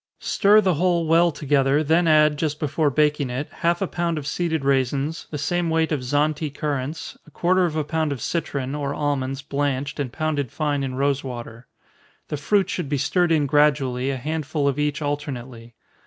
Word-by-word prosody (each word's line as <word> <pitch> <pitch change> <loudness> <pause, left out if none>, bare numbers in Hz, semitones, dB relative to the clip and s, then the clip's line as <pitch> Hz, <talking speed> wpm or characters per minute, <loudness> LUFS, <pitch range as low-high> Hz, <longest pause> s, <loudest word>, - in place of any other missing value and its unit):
Stir 210 +2 +4
the 185 -3 +2
whole 170 +1 +1
well 165 +2 +4
together, 145 0 +1
then 165 +3 +2
add, 155 -1 +5
just 150 -1 -2
before 150 0 +1
baking 150 -1 +1
it, 130 +4 -4
half 170 +2 +1
a - - -1
pound 170 -2 -2
of 150 - -5
seeded 160 -2 -1
raisins, 140 +3 0
the 150 - -4
same 175 +3 -1
weight 160 0 +1
of 150 - +1
Zante 150 +3 0
currants, 145 +1 -4
a - - -13
quarter 180 +3 +2
of 160 -3 -2
a 155 - 0
pound 155 0 -1
of 140 - -3
citron, 140 -2 -3
or 145 -1 -3
almonds 140 -2 -2
blanched, 140 0 -2
and 135 -4 -2
pounded 145 -3 -2
fine 145 -3 -1
in 130 -1 -3
rosewater. 130 -4 -3 0.6
The 150 - -2
fruit 190 +6 +2
should 175 -6 -3
be 145 - 0
stirred 170 +5 +1
in 155 -3 +3
gradually, 135 -3 +2
a 135 - -1
handful 150 +1 -2
of 140 +1 0
each 150 0 -1
alternately. 125 -5 -5
150 Hz, 185 wpm, -23 LUFS, 140-160 Hz, 0.6 s, add